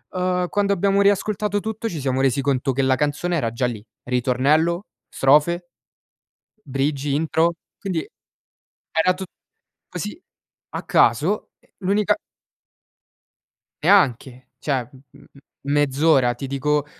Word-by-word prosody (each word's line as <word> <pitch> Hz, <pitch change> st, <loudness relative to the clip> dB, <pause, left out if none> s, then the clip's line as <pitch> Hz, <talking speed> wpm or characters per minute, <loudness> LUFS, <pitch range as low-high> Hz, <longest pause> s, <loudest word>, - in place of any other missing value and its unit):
ehm, 180 Hz, -1 st, 0 dB
quando 200 Hz, -1 st, +1 dB
abbiamo 200 Hz, +1 st, +2 dB
riascoltato 205 Hz, +1 st, +1 dB
tutto 220 Hz, +2 st, -4 dB
ci 165 Hz, -6 st, -5 dB
siamo 130 Hz, -1 st, -1 dB
resi 135 Hz, 0 st, +2 dB
conto 135 Hz, 0 st, 0 dB
che 135 Hz, -, 0 dB
la 130 Hz, 0 st, +3 dB
canzone 150 Hz, +5 st, -1 dB
era 115 Hz, -6 st, -1 dB
già 120 Hz, +2 st, 0 dB
lì, 110 Hz, -3 st, -6 dB, 0.2 s
ritornello, 140 Hz, -, +1 dB, 0.2 s
strofe, 170 Hz, +6 st, +2 dB, 0.9 s
bridge, 140 Hz, +1 st, -2 dB
intro, 160 Hz, +3 st, +1 dB, 0.3 s
quindi 180 Hz, -5 st, -3 dB, 0.8 s
era 175 Hz, +3 st, +3 dB
tut 190 Hz, +1 st, -7 dB, 0.6 s
così 210 Hz, +11 st, -6 dB, 0.5 s
a -, -, -4 dB
caso, -, -, +2 dB, 0.3 s
l'unica 200 Hz, +1 st, +2 dB, 1.7 s
Neanche. 130 Hz, -, +2 dB
Cioè, 130 Hz, -5 st, -1 dB, 0.3 s
m -, -, -17 dB
m -, -, -18 dB, 0.3 s
mezz'ora 145 Hz, -3 st, +3 dB
ti 135 Hz, +3 st, -6 dB
dico, 145 Hz, +2 st, 0 dB
150 Hz, 115 wpm, -22 LUFS, 135-185 Hz, 1.7 s, la